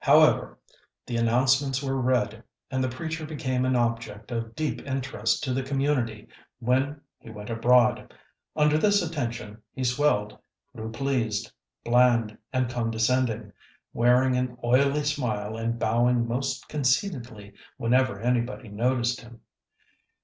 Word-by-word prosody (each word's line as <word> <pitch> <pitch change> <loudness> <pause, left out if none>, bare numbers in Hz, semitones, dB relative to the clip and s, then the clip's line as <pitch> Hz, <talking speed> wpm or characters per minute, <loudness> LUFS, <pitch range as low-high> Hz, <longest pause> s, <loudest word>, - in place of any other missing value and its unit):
However, - - +4 0.5
the 120 - -4
announcements 130 +4 +2
were 135 -1 -1
read, 125 -3 0 0.3
and 130 -1 0
the 130 - 0
preacher 160 +5 -5
became 130 -5 -2
an 130 0 +2
object 115 -2 -2
of 115 -1 -4
deep 155 +1 -2
interest 130 -5 -1
to 130 - -1
the 135 - 0
community 135 -5 -1 0.3
when 130 +4 0 0.2
he - - -13
went 105 0 -8
abroad. 120 +1 +3 0.4
Under 150 0 +3
this 205 +1 +3
attention 115 -8 -5
he 130 - -5
swelled, 125 -5 +1 0.4
grew 110 0 -5
pleased, 115 -5 -1 0.3
bland, 120 -2 +3 0.2
and 130 -1 +1
condescending, 115 -2 0 0.4
wearing 125 +2 +3
an 125 -1 -2
oily 140 +4 +3
smile 115 -7 -2
and 115 +1 -2
bowing 120 +1 +2
most 130 +2 -2
conceitedly 125 - -1 0.2
whenever 125 -3 +2
anybody 120 0 -1
noticed 120 +3 0
him. 120 0 -14
125 Hz, 125 wpm, -26 LUFS, 115-130 Hz, 0.5 s, However